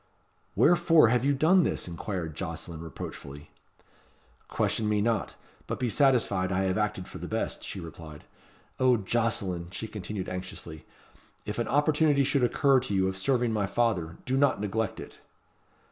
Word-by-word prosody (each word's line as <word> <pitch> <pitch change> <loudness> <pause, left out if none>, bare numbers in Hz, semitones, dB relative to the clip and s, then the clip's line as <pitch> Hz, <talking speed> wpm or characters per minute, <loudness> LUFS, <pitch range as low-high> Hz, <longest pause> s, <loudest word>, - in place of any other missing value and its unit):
"Wherefore 165 -6 +5
have 120 +1 +2
you 140 +1 +2
done 170 +7 +5
this?" - - -1
inquired 85 -1 -4
Jocelyn 80 -1 -5
reproachfully. 70 -3 -9 1.0
"Question 110 -1 0
me 105 -1 +2
not; 105 -5 0 0.3
but - - -3
be 125 -3 0
satisfied 115 -10 +2
I 95 0 +1
have 95 -1 0
acted 105 -3 -2
for - - -9
the - - -6
best," - - -3
she 100 - -6
replied. 80 -3 -10 0.6
"O 130 -1 +4
Jocelyn!" 100 -5 -1
she 110 +4 -5
continued 105 -2 -5
anxiously, 90 -4 -7 0.6
"if 105 +2 -4
an 120 - -1
opportunity 145 0 +3
should 135 0 +1
occur 135 +2 +4
to 125 -6 -3
you 95 0 +2
of 95 - -2
serving 120 +4 +1
my 105 -2 0
father, 95 -7 0
do 130 +1 0
not 140 -4 +3
neglect 105 +1 -2
it." - - -10
105 Hz, 160 wpm, -28 LUFS, 95-130 Hz, 1.0 s, Wherefore